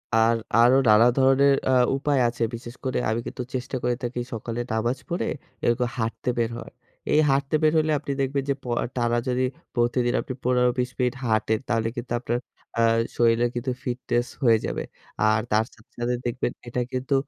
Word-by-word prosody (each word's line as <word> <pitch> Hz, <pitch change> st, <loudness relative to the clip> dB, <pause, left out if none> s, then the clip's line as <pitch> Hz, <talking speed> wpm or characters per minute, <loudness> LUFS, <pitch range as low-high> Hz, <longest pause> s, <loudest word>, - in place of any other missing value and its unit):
আর, 115 Hz, +1 st, +4 dB, 0.2 s
আরো 120 Hz, +3 st, +6 dB
নানা 105 Hz, +2 st, +7 dB
ধরনের 135 Hz, +1 st, +5 dB, 0.2 s
আ -, -, +4 dB, 0.3 s
উপায় 140 Hz, 0 st, +1 dB
আছে। 120 Hz, 0 st, -2 dB
বিশেষ 120 Hz, +1 st, -9 dB
করে 130 Hz, -, 0 dB
আমি 110 Hz, +1 st, 0 dB
কিন্তু 125 Hz, -, -5 dB
চেষ্টা 125 Hz, +1 st, -3 dB
করে 120 Hz, 0 st, +1 dB
থাকি 120 Hz, 0 st, -3 dB
সকালে 115 Hz, +1 st, -4 dB
নামাজ 120 Hz, +4 st, 0 dB
পড়ে, 175 Hz, +1 st, -1 dB, 0.4 s
এরকম 120 Hz, +1 st, +2 dB
হাঁটতে 115 Hz, +2 st, -2 dB
বের 115 Hz, -1 st, +1 dB
হওয়ার। 120 Hz, -, -9 dB, 0.4 s
এই 150 Hz, -, +5 dB
হাটতে 140 Hz, +2 st, +1 dB
বের 155 Hz, -, +5 dB
হইলে 155 Hz, 0 st, +2 dB
আপনি 140 Hz, -, -5 dB
দেখবেন 135 Hz, +1 st, 0 dB
যে -, -, +4 dB
প -, -, -20 dB, 0.2 s
আ -, -, -1 dB
টানা 120 Hz, -1 st, +1 dB
যদি 125 Hz, 0 st, +1 dB, 0.3 s
প্রতিদিন 120 Hz, 0 st, +1 dB
আপনি 130 Hz, -, -6 dB
১৫-২০ 125 Hz, 0 st, +2 dB
মিনিট 125 Hz, -1 st, +1 dB
হাঁটেন, 110 Hz, -1 st, +1 dB
তাহলে 115 Hz, -1 st, +1 dB
কিন্তু 120 Hz, 0 st, -6 dB
আপনার 120 Hz, 0 st, -1 dB, 0.4 s
অ্যা 115 Hz, -, +2 dB, 0.3 s
শরীরে 115 Hz, 0 st, +4 dB
কিন্তু 120 Hz, +2 st, -2 dB
ফিটনেস 120 Hz, -1 st, -1 dB, 0.2 s
হয়ে 115 Hz, -3 st, +6 dB
যাবে। -, -, -3 dB, 0.4 s
আর 110 Hz, 0 st, +4 dB
তার 110 Hz, +1 st, +3 dB
সাথে, 110 Hz, -, -22 dB
সাথে 120 Hz, +1 st, 0 dB
দেখবেন 120 Hz, 0 st, -1 dB, 0.2 s
এটা 125 Hz, +1 st, -2 dB
কিন্তু 130 Hz, +2 st, -1 dB
120 Hz, 185 wpm, -25 LUFS, 115-130 Hz, 0.4 s, নানা